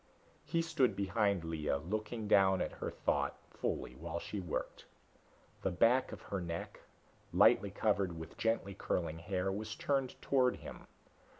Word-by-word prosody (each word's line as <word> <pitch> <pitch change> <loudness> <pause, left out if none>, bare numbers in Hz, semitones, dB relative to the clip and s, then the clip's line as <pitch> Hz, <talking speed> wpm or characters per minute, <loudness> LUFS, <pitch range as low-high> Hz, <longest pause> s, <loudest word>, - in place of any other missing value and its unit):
He 165 +1 0
stood 135 -6 +2
behind 100 -2 +1
Lea, 80 -3 -1
looking 105 +8 -3
down 95 -2 +5
at - - -1
her - - -4
thoughtfully 60 - -2
while 80 +6 -5
she 100 +4 -4
worked. 90 -4 -4 0.8
The - - +1
back 115 +8 +3
of - - -8
her 100 -2 -3
neck, 85 -1 -5 0.5
lightly 100 - +5
covered 100 -4 +1
with 80 - -8
gently 115 -3 0
curling 85 -4 -2
hair, 90 +2 -1
was 105 +2 -4
turned 135 -3 -1
toward 130 -2 +3
him. - - -10
100 Hz, 140 wpm, -35 LUFS, 85-115 Hz, 0.8 s, down